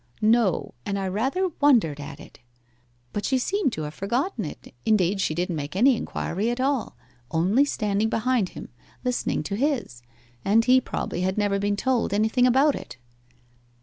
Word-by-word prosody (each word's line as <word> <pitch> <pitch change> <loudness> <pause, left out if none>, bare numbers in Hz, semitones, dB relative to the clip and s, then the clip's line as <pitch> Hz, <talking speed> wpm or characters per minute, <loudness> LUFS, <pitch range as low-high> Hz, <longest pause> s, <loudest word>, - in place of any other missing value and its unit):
'No 220 -4 +2
and 200 - -2
I 195 -1 -2
rather 265 - 0
wondered 225 - +4
at 140 -1 -8
it. - - -14 0.7
But 205 - -2
she 265 - +1
seemed 380 +3 0
to 155 - -4
have 150 0 -5
forgotten 235 - -2
it 150 - -9
indeed, 195 -2 +2
she 155 - 0
didn't 175 0 -1
make 150 +2 -5
any 250 +6 +5
inquiry 210 0 -2
at 240 +1 -2
all, 265 -2 0 0.3
only 190 - +3
standing 210 -4 0
behind 230 -3 +1
him, - - -8 0.3
listening 250 -1 -1
to 200 - -3
his; 245 - -1 0.4
and 225 +3 +3
he 255 0 +5
probably 175 - -4
had 190 +2 -1
never 205 -1 +1
been 205 0 0
told 240 -2 0
anything 220 +4 +3
about 270 +4 +4
it. - - -8
215 Hz, 170 wpm, -25 LUFS, 190-255 Hz, 0.7 s, any